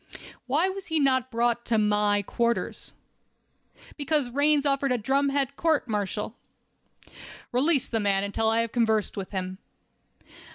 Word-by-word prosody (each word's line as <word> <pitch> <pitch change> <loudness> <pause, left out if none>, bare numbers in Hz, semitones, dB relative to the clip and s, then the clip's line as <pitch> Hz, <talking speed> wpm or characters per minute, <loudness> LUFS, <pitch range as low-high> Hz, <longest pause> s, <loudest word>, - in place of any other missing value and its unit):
"Why 300 +8 +2
was 385 0 -6
he 320 -1 +1
not 260 -3 +2
brought 235 0 0
to 230 - +1
my 210 -1 +2
quarters?" 235 +4 -2 1.0
"Because 285 -3 0
Raines 290 +2 +3
ordered 275 -1 +1
a 250 - +2
drumhead 275 +3 0
court 320 -5 +1
martial." 210 0 -3 1.2
"Release 275 +2 +2
the 225 - -1
man 200 -2 +1
until 220 +2 0
I 225 +1 +2
have 230 -1 -3
conversed 220 -3 +1
with 195 -2 -5
him." 185 -1 -4
240 Hz, 135 wpm, -26 LUFS, 210-280 Hz, 1.2 s, Raines